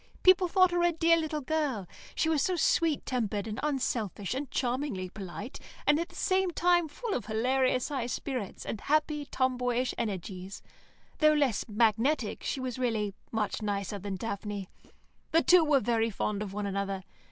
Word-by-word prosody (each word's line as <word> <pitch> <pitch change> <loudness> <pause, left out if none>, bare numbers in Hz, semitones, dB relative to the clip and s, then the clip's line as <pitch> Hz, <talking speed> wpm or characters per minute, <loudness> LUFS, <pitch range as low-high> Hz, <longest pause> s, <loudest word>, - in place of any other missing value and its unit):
People 370 0 +6
thought 370 0 +4
her 350 0 +1
a 345 0 +4
dear 330 0 +4
little 315 -2 -2
girl; 275 - -1 0.3
she - - +1
was 315 -3 +2
so 370 - +1
sweet 330 -2 +2
tempered, 215 -5 -1
and 220 +2 -4
unselfish, 245 - -1
and 275 +1 -4
charmingly 245 -7 -2
polite, 195 +6 -7 0.3
and 295 +1 +4
at 340 - -3
the - - -16
same 375 -1 +1
time 350 -1 +3
full 440 +8 -4
of 245 - -3
hilarious 255 +4 +1
high 265 -5 -2
spirits, 250 -4 -4
and 215 - -4
happy, 300 0 +1
tomboyish 250 -2 0
energies. 195 -3 -4 0.6
Though 305 0 +6
less 280 -7 +1
magnetic, 225 +3 +1
she - - -2
was 255 -1 -4
really 220 -5 0 0.2
much 215 -2 -1
nicer 205 -1 -2
than 195 0 -4
Daphne. 200 -1 -4 0.6
The 330 - +3
two 360 -2 +7
were 295 -3 +4
very 230 -2 +1
fond 210 0 -2
of 205 -2 -4
one 205 +1 -3
another. 195 -1 -2
250 Hz, 170 wpm, -30 LUFS, 210-305 Hz, 0.6 s, two